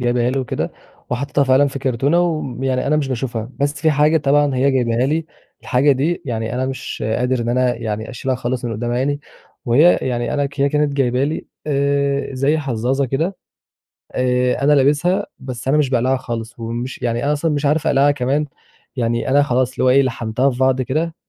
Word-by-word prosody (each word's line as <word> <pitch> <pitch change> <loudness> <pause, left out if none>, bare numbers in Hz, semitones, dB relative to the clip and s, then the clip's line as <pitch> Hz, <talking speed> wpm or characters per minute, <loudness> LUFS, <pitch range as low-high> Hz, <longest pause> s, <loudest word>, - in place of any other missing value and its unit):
جايباها 120 0 +1
لي 135 - -1
وكده 130 -3 -3 0.4
وحطّيتها 140 +3 0
فعلًا 135 +2 +4
في 135 0 -4
كرتونة 135 +5 +1
وم 155 -7 -2
يعني 130 0 0
أنا 150 +2 +2
مش 140 -3 -1
باشوفها. 120 -2 -3
بس 145 +1 0
في 160 - +4
حاجة 150 +2 +3
طبعًا 145 -1 +2
هي 135 +2 +2
جايباها 125 -1 +1
لي 155 +2 -1 0.4
الحاجة 140 +3 +3
دي 155 +7 -1
يعني 115 -2 -3
أنا 130 +1 -1
مش 135 -4 -5
قادر 125 0 0
إن 115 - -2
أنا 125 0 +2
يعني 110 0 -4
أشيلها 130 +1 -2
خالص 125 0 -3
من 115 - -2
قدّام 120 +3 -3
عيني، 145 +4 0 0.4
وهي 145 +9 +5
يعني 120 -2 -1
أنا 145 -1 +1
ك 140 0 -8
هي 140 - +4
كانت 150 0 +1
جايبة 130 -1 +1
لي 155 +2 -3 0.2
آآ 140 -1 0
زي 140 +4 +1
حظّاظة 135 0 -1
كده. 160 +9 -1 0.8
آآ 125 0 +1
أنا 150 +1 +5
لابسها 150 +8 +2
بس 130 -1 -7
أنا 150 +3 +3
مش 145 -4 +2
باقلعها 130 +1 +1
خالص. 120 -2 -6
ومش 120 +3 -5
يعني 120 0 -1
أنا 145 +1 +2
أصلًا 155 +2 0
مش 145 0 -1
عارف 150 +2 +1
أقلعها 140 +1 +4
كمان، 140 +2 0 0.5
يعني 120 -1 -1
أنا 145 +1 +4
خلاص 130 -1 +1
اللي - - -2
هو 130 - +4
إيه، 135 +2 +5
لحَمتها 120 +1 0
في 125 - -5
بعض 130 0 +2
كده 160 +6 -2
130 Hz, 200 wpm, -19 LUFS, 125-145 Hz, 0.8 s, وهي